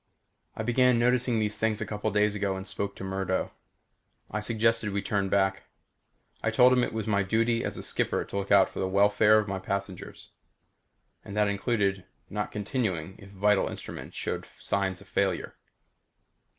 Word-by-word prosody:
I 110 - -3
began 125 +1 +3
noticing 125 0 +2
these 105 -1 -1
things 110 -1 +1
a 105 - -2
couple 105 0 -4
of 110 - -2
days 105 0 +3
ago 100 -2 -1
and 95 0 -6
spoke 100 0 -3
to - - -8
Murdo. 95 -1 -2 0.8
I 105 - -1
suggested 115 0 +1
we 100 -1 -2
turn 100 -1 0
back. 95 0 +1 0.8
I 115 - +1
told 125 +3 +5
him 125 -1 +3
it - - -1
was 110 -1 -3
my 100 -2 +2
duty 115 +4 +1
as - - -3
a - - -5
skipper - - 0
to - - -6
look 100 0 -3
out 100 -1 +6
for - - -8
the 95 - 0
welfare 105 +2 +4
of 105 -1 +1
my 95 -1 -3
passengers. 100 -1 -5 0.9
And 100 - -8
that 105 -1 +3
included 100 -2 0 0.3
not 105 0 -3
continuing 100 - -2
if 100 -2 -13
vital 100 0 +2
instruments - - -8
showed - - -3
signs 95 -2 -1
of 100 - -15
failure. 100 -2 -1
105 Hz, 180 wpm, -28 LUFS, 95-110 Hz, 0.9 s, out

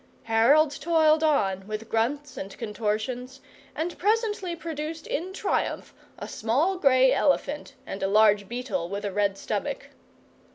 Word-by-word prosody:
Harold 255 +7 +4
toiled 315 0 +3
on 195 -11 +1
with 215 +1 -5
grunts 275 +7 -1
and 195 0 -7
contortions, 230 +4 -3 0.4
and 335 +3 -3
presently 415 -3 0
produced 320 -1 -5
in 355 +5 -3
triumph 390 +1 -2 0.2
a - - -7
small 275 - 0
grey 260 -4 +5
elephant 285 +1 0
and 195 - -6
a - - +1
large 205 -1 +4
beetle 240 -8 -3
with 200 +1 -4
a 200 - -2
red 200 -1 +1
stomach. - - -4
260 Hz, 135 wpm, -26 LUFS, 215-315 Hz, 0.4 s, grey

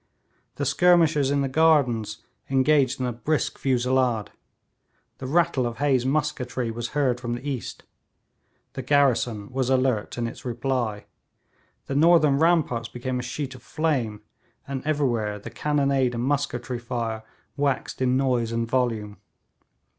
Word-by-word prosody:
The - - -2
skirmishers 165 -6 +4
in 140 0 +1
the 135 - 0
gardens 130 -8 +2 0.3
engaged 135 0 +3
in 130 - -1
a 125 - -2
brisk 150 +6 -1
fusillade. 125 -3 +1 0.9
The 130 - -5
rattle 160 -4 +2
of 115 -1 -6
Hay's 130 -2 +1
musketry 130 -5 -1
was 120 +1 -4
heard 130 -4 +1
from 120 -1 -2
the 130 +4 -7
east. 135 -4 -5 0.9
The - - -4
garrison 125 -6 +1
was 130 -1 -1
alert 130 -5 +1
in 120 - -1
its 115 - -7
reply. 120 -3 -2 0.8
The - - -4
northern 155 -2 +4
ramparts 155 -8 +2
became 125 +1 -3
a - - -2
sheet 135 +2 -5
of 125 - -13
flame, 135 -10 -2 0.4
and 135 -1 -4
everywhere 120 -9 0
the 105 - -9
cannonade 140 -4 +1
and 115 - -2
musketry 130 -3 -1
fire 115 -2 -3 0.3
waxed 140 -2 -1
in 130 0 +2
noise 125 -4 +1
and 115 0 -1
volume. 115 -4 -1
130 Hz, 140 wpm, -25 LUFS, 120-145 Hz, 0.9 s, skirmishers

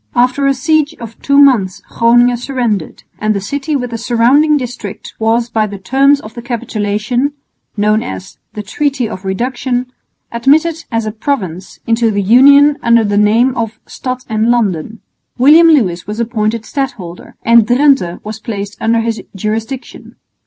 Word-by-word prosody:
After 255 +3 +2
a 275 - +3
siege 310 +2 0
of 230 -2 -10
two 280 0 +1
months 245 -10 +4
Groningen 240 +1 +3
surrendered; 240 - -3 0.2
and 215 0 0
the - - -1
city 285 +9 -3
with 250 -3 -3
the 230 - -5
surrounding 255 +7 +3
district 245 -6 -7
was 225 +1 +1
by 220 -2 -1
the 200 -1 -7
terms 270 +8 +2
of 220 -4 -11
the 240 - -8
capitulation 235 +2 -2 0.4
known 210 +1 +2
as 95 0 -8
"The 210 - -6
Treaty 270 +3 -2
of 200 -3 -8
Reduction" 245 +5 -3 0.4
admitted 310 +7 +1
as 225 -1 -1
a 215 - -3
province 195 - -4
into 230 0 +1
the 205 -2 -1
Union 280 +7 +5
under 235 -1 +3
the 205 -1 -1
name 225 +5 +3
of 225 -2 -4
Stad 255 -1 -6
en 220 0 0
Landen. 220 -3 -1 0.4
William 305 +7 +6
Lewis 190 - +2
was 210 +2 -5
appointed 225 -1 -2
stadholder, 230 - -6
and 230 -1 +4
Drente 250 -8 +2
was 215 +1 -6
placed 205 -2 -6
under 225 +1 +1
his 225 -1 -3
jurisdiction. 225 +6 -5
235 Hz, 160 wpm, -14 LUFS, 215-265 Hz, 0.4 s, William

